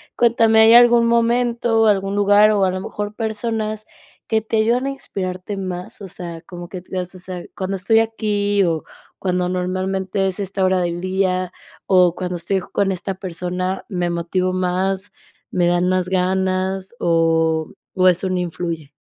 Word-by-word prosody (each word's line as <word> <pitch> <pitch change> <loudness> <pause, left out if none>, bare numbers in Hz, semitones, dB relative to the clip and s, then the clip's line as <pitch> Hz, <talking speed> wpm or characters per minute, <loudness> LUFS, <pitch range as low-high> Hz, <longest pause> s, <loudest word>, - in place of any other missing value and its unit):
cuéntame, 225 -2 +4
¿hay 225 +1 +7
algún 240 -1 +7
momento 235 0 +2
o - - +5
algún 195 -2 +1
lugar 205 +1 +5
o 205 -2 +3
a 185 - +1
lo 185 0 -4
mejor 205 +1 -5
personas 220 -1 -3 0.4
que 220 0 +1
te 220 +1 -2
ayudan 235 +5 +2
a - - 0
inspirarte 190 -7 -5
más?, 185 0 -6
o 195 - -7
sea, 170 -2 -7
como 175 0 -9
que 180 0 -7
t - - -26
mas, 180 0 -4
ó 185 - -11
sea, 180 -1 -7
cuando 190 +1 -3
estoy 195 +4 +3
aquí 205 -3 0
o 165 -3 -1 0.3
cuando 180 -1 0
normalmente 185 +1 -1
es 190 0 -2
esta 195 -1 -2
hora 185 -1 +2
del 175 0 -2
día 185 -1 -1 0.3
o 180 -2 +4
cuando 180 -1 -3
estoy 190 +3 -1
con 195 +2 -1
esta 190 +1 -3
persona, 185 0 -4
¿me 180 -4 -2
motivo 175 +2 -1
más, 185 +1 -1 0.4
me 175 -1 +2
dan 175 +1 +2
más 185 -1 0
ganas 190 +2 -1
o 165 -1 +1 0.2
o 185 -1 +3
eso 185 +1 +2
no 185 - 0
influye? 170 -4 -4
185 Hz, 175 wpm, -20 LUFS, 180-210 Hz, 0.4 s, hay